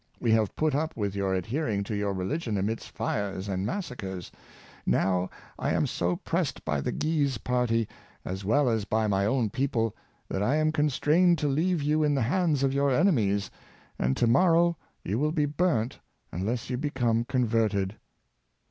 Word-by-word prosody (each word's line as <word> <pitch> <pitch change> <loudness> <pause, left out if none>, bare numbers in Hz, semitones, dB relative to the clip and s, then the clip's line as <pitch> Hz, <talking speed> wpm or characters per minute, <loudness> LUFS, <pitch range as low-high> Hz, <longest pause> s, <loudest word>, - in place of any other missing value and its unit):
We 115 - +1
have 110 -3 +2
put 155 -2 +1
up 155 0 -1
with 100 -3 -1
your 95 -1 0
adhering 110 - -1
to 105 - -5
your 100 -1 0
religion 105 - -2
amidst 105 +4 -2
fires 100 -3 -3
and 95 0 -2
massacres: 100 - -5 0.5
now 95 -1 +1 0.3
I - - 0
am - - +2
so 90 +1 -1
pressed 165 - -2
by 75 -3 0
the - - -2
Guise 145 -5 0
party 115 -2 0 0.4
as 95 +2 -4
well 135 +8 +3
as 110 -3 +1
by 110 +2 0
my 100 -1 +1
own 115 -3 +1
people, 120 -4 0 0.3
that 95 - -2
I 125 +8 +2
am 155 0 +2
constrained 155 +4 +3
to 150 - 0
leave 160 +3 +1
you 150 +2 +2
in 145 -1 +2
the 135 - +1
hands 155 +1 +1
of 135 - +3
3^our 140 -1 +2
enemies, 105 - +2 0.5
and 65 +2 +1
to - - +3
morrow 170 +6 +4 0.3
you 105 +6 -1
will 150 +2 +1
be 155 -2 +1
burnt 145 -6 0 0.3
unless 110 +7 -2
you 125 - 0
become 120 -5 0
converted." 110 -6 0
120 Hz, 175 wpm, -28 LUFS, 100-150 Hz, 0.5 s, morrow